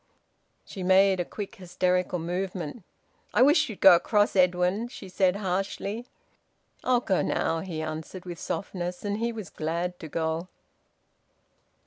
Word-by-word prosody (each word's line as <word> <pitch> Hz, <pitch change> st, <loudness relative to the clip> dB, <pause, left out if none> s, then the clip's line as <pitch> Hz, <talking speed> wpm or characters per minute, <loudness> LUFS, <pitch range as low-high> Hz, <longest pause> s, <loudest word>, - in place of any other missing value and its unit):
She 190 Hz, -, -8 dB
made 190 Hz, +1 st, +4 dB
a -, -, +2 dB
quick 210 Hz, +4 st, -7 dB
hysterical 180 Hz, 0 st, 0 dB
movement. 180 Hz, +3 st, -4 dB, 0.5 s
"I 245 Hz, -, +6 dB
wish 300 Hz, +1 st, +4 dB
you'd 215 Hz, -, -8 dB
go 190 Hz, -, +10 dB
across, 205 Hz, +5 st, +3 dB
Edwin," 180 Hz, +4 st, +2 dB
she 220 Hz, -5 st, -10 dB
said 185 Hz, 0 st, +2 dB
harshly. 200 Hz, +4 st, -3 dB, 0.8 s
"I'll 250 Hz, -1 st, +3 dB
go 190 Hz, -6 st, +1 dB
now," 165 Hz, -, 0 dB
he 160 Hz, -3 st, -4 dB
answered, 160 Hz, +4 st, -6 dB
with 175 Hz, -2 st, -7 dB
softness. 180 Hz, -1 st, -4 dB
And 205 Hz, +1 st, -1 dB
he 235 Hz, +1 st, 0 dB
was 215 Hz, -8 st, -7 dB
glad 170 Hz, +3 st, -3 dB
to 160 Hz, -, -7 dB
go. 160 Hz, +2 st, -2 dB
185 Hz, 140 wpm, -27 LUFS, 175-205 Hz, 0.8 s, go